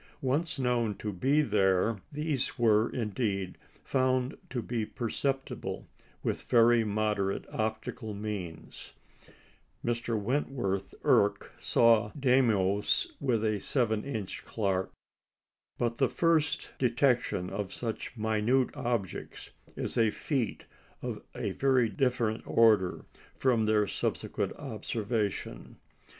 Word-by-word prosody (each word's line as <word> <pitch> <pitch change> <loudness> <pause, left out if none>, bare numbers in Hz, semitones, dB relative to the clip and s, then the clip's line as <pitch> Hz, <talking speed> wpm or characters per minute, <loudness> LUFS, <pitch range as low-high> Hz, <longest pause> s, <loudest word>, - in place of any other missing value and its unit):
Once 145 +5 0
known 120 -5 +1
to 105 +1 -4
be 135 +11 +3
there, 100 -2 +2
these 150 -3 -2
were, 110 -2 +4
indeed, 100 -5 -2 0.3
found 130 -1 +1
to 125 - -2
be 115 0 -2
perceptible 135 +5 -3 0.4
with - - -1
very 120 0 +5
moderate 105 -2 0
optical 110 0 -3
means 100 -6 -6 0.9
(Mr. 120 -1 0
Wentworth 105 -5 -1
Erck - - +3
saw 115 -3 +4
Deimos 110 -7 +2
with 120 -5 +1
a 110 -1 +1
7 110 -2 0
inch 110 -8 -5
Clark); 95 -4 -1 0.9
but 120 -1 -1
the 135 - +3
first 160 -3 +1
detection 120 -7 +1
of 100 -3 -3
such 115 +3 -5
minute 110 +4 +1
objects 120 -7 -3 0.2
is - - -2
a 115 -1 +5
feat 125 0 -2 0.4
of - - -4
a - - -2
very 130 -4 +3
different 120 -3 0
order 105 -6 +4 0.3
from 120 -5 +2
their 105 -1 +3
subsequent - - -2
observation. 105 - -3
115 Hz, 110 wpm, -30 LUFS, 105-130 Hz, 0.9 s, very